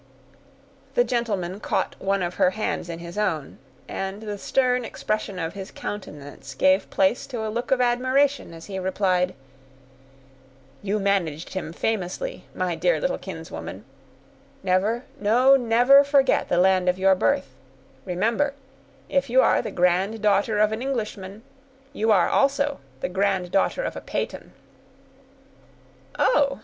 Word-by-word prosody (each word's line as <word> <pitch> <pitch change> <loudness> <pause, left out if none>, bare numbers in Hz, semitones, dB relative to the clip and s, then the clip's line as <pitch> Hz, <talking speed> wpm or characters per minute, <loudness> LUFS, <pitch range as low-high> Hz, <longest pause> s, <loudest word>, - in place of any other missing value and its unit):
The - - +5
gentleman 205 - -2
caught - - -1
one 195 -1 0
of 175 0 -2
her - - +6
hands 190 -3 -3
in 165 - -5
his 170 +4 -7
own, 160 -9 -2 0.3
and 195 +2 -5
the 205 -2 -5
stern 250 +1 +1
expression 215 -3 -3
of 165 -1 -3
his 195 -1 -7
countenance 145 -8 -8
gave 190 +6 +3
place 195 +5 +1
to 235 -5 -4
a 215 - -3
look 240 +2 -3
of 265 - +3
admiration 255 +1 +1
as 165 0 -11
he 190 -2 -5
replied,— 185 -1 0 1.5
"You 205 +1 -1
managed 180 -6 -1
him 185 -4 -4
famously, 220 - -3
my - - -1
dear - - +1
little - - -1
kinswoman; - - -8 0.8
never—no, 225 +6 +2
never, 250 +3 +5
forget 280 -1 +2
the 175 - +1
land 185 0 +4
of 180 - +1
your 190 0 +4
birth; 130 -5 0 0.5
remember, 230 +10 0 0.5
if 275 -1 0
you 255 +2 +4
are - - +3
the - - -5
granddaughter 200 +4 +1
of 215 0 +3
an 220 +2 -3
Englishman, 215 -6 -4 0.5
you 220 -4 +1
are, 190 -5 +4
also, 280 +1 +1 0.2
the - - -2
granddaughter 195 - 0
of - - -3
a - - -6
Peyton." - - -4 1.7
"Oh!" 280 - +3
205 Hz, 135 wpm, -24 LUFS, 185-245 Hz, 1.7 s, her